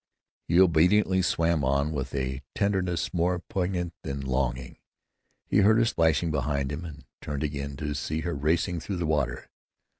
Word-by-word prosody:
He 85 +2 +3
obediently 95 +2 +4
swam 85 -3 +1
on, 70 +3 +1
with 70 -3 -4
a 65 0 -2
tenderness 95 -4 0
more 90 +1 +1
poignant 90 -1 -3
than 70 0 -4
longing. 65 -1 -2 0.7
He - - +1
heard 105 +2 +5
her 115 - +4
splashing 80 -5 +2
behind 70 -1 -1
him, 75 +4 -5
and 80 -4 -10 0.2
turned 70 0 -4
again, 70 -1 -4
to 75 0 -3
see 75 +3 -3
her 85 +1 -2
racing 80 +4 0
through 95 +4 -4
the 85 - -1
water. 70 -6 -1
80 Hz, 160 wpm, -27 LUFS, 70-90 Hz, 0.7 s, heard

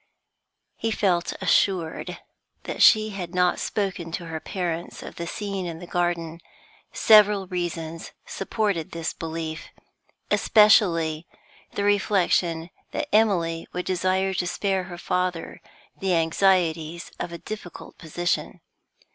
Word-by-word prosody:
He 225 - -1
felt 185 -5 +1
assured 175 -5 +1 0.5
that - - -4
she 215 -1 +6
had 180 -3 -6
not 180 -1 +2
spoken 185 -5 -2
to 175 -1 -4
her 160 -1 -5
parents 175 -1 -4
of - - -8
the 170 - -4
scene 195 -2 -4
in 165 -1 -5
the 175 - -9
garden; 170 -1 -2 0.5
several 210 -2 +5
reasons 165 -3 -4
supported 195 -5 -2
this 165 -1 -3
belief, 160 -1 -5 0.6
especially 170 -7 +4 0.5
the 200 - -2
reflection 185 -4 +1 0.2
that 300 -1 -3
Emily 175 -7 +2
would 180 - -3
desire 185 +1 +1
to 180 -1 -1
spare 190 +1 -1
her 175 -1 -8
father 180 -1 -2 0.4
the 190 -2 +1
anxieties 165 -1 +1
of 175 - -4
a 170 - -6
difficult 180 -2 -9
position. 175 +2 -2
175 Hz, 120 wpm, -25 LUFS, 165-195 Hz, 0.6 s, she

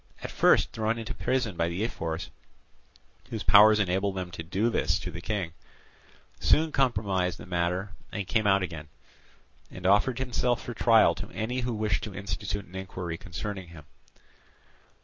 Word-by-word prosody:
At - - -5
first - - +4
thrown 110 +1 -1
into 115 +2 -5
prison 125 -7 -1
by 85 0 +1
the 90 +5 -2
ephors 85 -7 -4 1.0
(whose 110 -3 -4
powers 105 +3 +7
enable 95 0 +1
them 90 -2 -5
to 85 - -6
do 95 +8 0
this - - +1
to 90 - -6
the 85 0 -7
King), 95 -5 -3 0.9
soon 160 0 +3
compromised 100 -10 +1
the - - -10
matter 90 +2 -1 0.2
and 100 -2 -3
came 110 +2 +1
out 100 -1 +4
again, 80 -4 -6 0.8
and 90 - -10
offered 105 +6 +4
himself 125 -1 0
for 120 - -5
trial 115 0 +5
to - - -7
any 120 +4 -3
who 120 -2 -2
wished 105 -2 0
to 105 -3 -8
institute 100 +1 -4
an 90 - -19
inquiry 90 -3 -5
concerning 95 +3 -6
him. 80 -3 -13
100 Hz, 165 wpm, -28 LUFS, 90-110 Hz, 1.0 s, powers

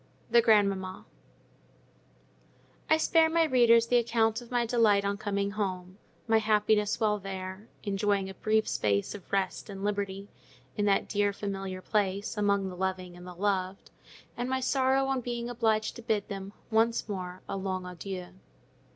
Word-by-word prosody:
THE 235 - +7
GRANDMAMMA 200 -4 +2 1.8
I 315 - +5
spare 320 0 +4
my 330 0 +3
readers 235 -5 +5
the 245 +1 +3
account 225 -1 +1
of 240 - -13
my 245 -1 +1
delight 220 -4 +3
on 200 0 0
coming 200 -1 -2
home, 185 -2 -4 0.3
my 225 -1 +4
happiness 210 -1 +2
while 210 -2 +2
there—enjoying 195 +1 -3
a 190 - -7
brief 220 +2 +1
space 100 -1 0
of 205 -4 -11
rest 195 +1 -1
and 195 -1 -7
liberty 200 -1 -2 0.5
in 205 - 0
that 200 -1 +2
dear, 205 -1 +1
familiar 195 -2 -5
place, 200 0 -1
among 200 -2 +1
the 185 - -6
loving 185 -1 -3
and 180 +1 -11
the 180 - -9
loved—and 195 +5 -4
my 260 0 0
sorrow 265 +1 +2
on 270 -1 0
being 240 0 -4
obliged 220 -2 0
to - - -8
bid 220 -3 -1
them, 195 0 -6 0.2
once 225 +1 +2
more, 185 -3 -5
a - - -3
long 190 -1 -3
adieu. 180 0 -6
205 Hz, 155 wpm, -29 LUFS, 190-225 Hz, 1.8 s, THE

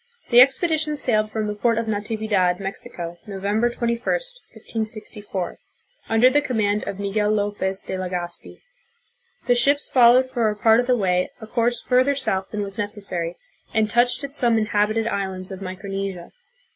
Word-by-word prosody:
The 240 - +7
expedi 300 +5 +4
tion 300 -1 -1
sailed 215 -5 +3
from 215 0 -3
the 210 - -2
port 230 +2 +1
of 230 - -1
Natividad, 210 -4 0
Mexico, 175 -3 -6
November 205 +4 0
21, 235 -1 -2
1564, 220 - -4 0.5
under 225 +3 +5
the 290 +3 +3
command 210 -6 0
of 195 - -4
Miguel 205 +1 -1
Lopez 205 -2 -1
de - - -6
Legazpi. 180 -2 -5 0.8
The 245 - +4
ships 280 +4 +2
followed 250 +1 +5
for 240 -4 0
a 210 - -3
part 220 +2 +4
of 245 - 0
the 250 -1 +3
way 180 -3 +1
a 220 - -8
course 235 +1 0
further 255 +3 +2
south 190 -8 -1
than 210 -1 -3
was 200 +2 -6
necessary, 195 -5 -2 0.4
and 215 -1 +2
touched 245 +3 +3
at 280 0 -6
some 235 -4 +3
inhabited 215 +1 +1
islands 190 -3 -3
of 190 0 -8
Micronesia. 195 -1 -5
215 Hz, 160 wpm, -22 LUFS, 195-240 Hz, 0.8 s, The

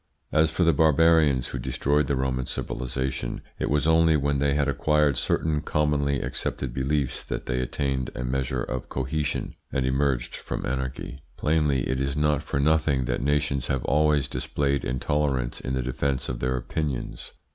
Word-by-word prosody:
As 80 0 +4
for 85 +3 0
the 85 -1 +5
barbarians 75 -3 +4
who 65 - -4
destroyed 70 +3 +1
the 70 - +1
Roman 65 -1 -1
civilisation, 65 0 -3 0.2
it - - -1
was 75 +1 +2
only 80 -1 +5
when 70 0 0
they 70 0 +2
had 75 -1 +2
acquired 75 +1 +2
certain 75 +4 0
commonly 75 -3 +1
accepted 60 -3 -3
beliefs 70 +1 -1
that - - -5
they 60 +1 -1
attained 65 0 -1
a 60 - -3
measure 65 +1 -1
of 65 -1 -4
cohesion 70 +3 -2 0.2
and 65 - 0
emerged 65 -1 0
from - - -5
anarchy. 65 +1 -4 0.2
Plainly 75 -4 +1
it 65 0 -1
is 70 +1 -1
not 75 -1 +2
for 70 - -2
nothing 75 -3 +2
that - - -1
nations 70 -1 0
have 65 -2 -1
always 75 0 +3
displayed 70 -1 -1
intolerance 65 0 -1
in 65 - -3
the 65 - -1
defence 65 +1 -1
of - - -3
their 65 0 0
opinions. 65 +2 -4
70 Hz, 170 wpm, -26 LUFS, 65-75 Hz, 0.2 s, the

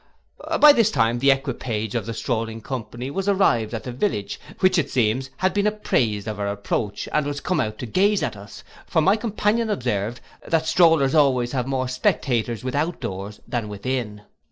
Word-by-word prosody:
By 300 -1 +9
this 230 -5 +3
time 115 - +1
the 135 +2 +3
equipage 120 -5 -1
of 115 -3 -2
the 115 - -4
strolling 115 0 -2
company 125 +2 -6
was 195 +5 -1
arrived 120 - +2
at 110 - -5
the 125 - -5
village, 120 - -2 0.2
which, 185 -2 +4
it 145 - -1
seems, 125 +2 0
had 185 0 +1
been 205 0 +1
apprised 115 - 0
of 105 -1 -4
our 100 - -1
approach, 100 0 -3
and 150 -1 +1
was 145 -1 -3
come 180 +5 -1
out 110 0 -2
to - - -5
gaze 195 - +2
at - - -2
us; 100 0 -11 0.2
for - - +1
my 190 +6 +4
companion 220 0 0
observed, 120 - -2 0.3
that 160 -1 +1
strollers 160 -4 +4
always 130 -6 +3
have 125 -2 -2
more 130 -1 -1
spectators 120 -2 0
without 145 +7 -1
doors 100 +2 -6
than 115 -3 -3
within. 105 0 -4
130 Hz, 185 wpm, -23 LUFS, 110-165 Hz, 0.3 s, By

